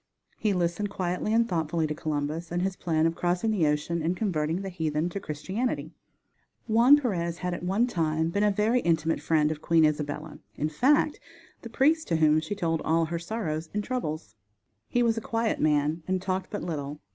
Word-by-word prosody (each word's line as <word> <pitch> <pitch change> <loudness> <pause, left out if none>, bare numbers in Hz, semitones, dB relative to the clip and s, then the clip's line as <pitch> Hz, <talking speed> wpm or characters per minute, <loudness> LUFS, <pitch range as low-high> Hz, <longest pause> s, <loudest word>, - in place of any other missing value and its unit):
He 215 - +1
listened 180 +2 0
quietly 185 +1 -2
and 230 +1 +3
thoughtfully 165 -3 0
to 150 - -2
Columbus 155 +2 -3
and 175 +1 0
his 190 0 -1
plan 160 -3 0
of 165 - +2
crossing 180 +6 0
the 180 -8 +2
ocean 150 +3 0
and 170 +3 -1
converting 170 -3 -1
the 195 - -4
heathen 160 -2 -1
to 200 - -4
Christianity. 195 - -3 0.7
Juan 240 +6 +6
Perez 175 - -2
had 180 0 -3
at - - -5
one 195 +7 +1
time 160 -7 0
been 200 - 0
a 210 - +4
very 210 +5 +2
intimate 165 -4 +1
friend 155 -2 +2
of 155 -1 -5
Queen 165 -1 +4
Isabella; 150 0 -2 0.2
in 150 - -1
fact, 290 - +2 0.4
the 230 - -8
priest 310 +7 +2
to 165 - +1
whom 155 -1 +4
she 160 +6 -4
told 165 -5 -1
all 165 +1 +2
her 170 +1 -3
sorrows 170 -5 -3
and 210 - 0
troubles. 155 - -4 0.6
He 245 - +2
was 225 -1 +2
a - - -12
quiet 230 -3 -1
man 150 +2 +2
and 185 0 +1
talked 185 0 -2
but 205 - -4
little. 150 -3 -4
170 Hz, 195 wpm, -27 LUFS, 155-210 Hz, 0.7 s, Juan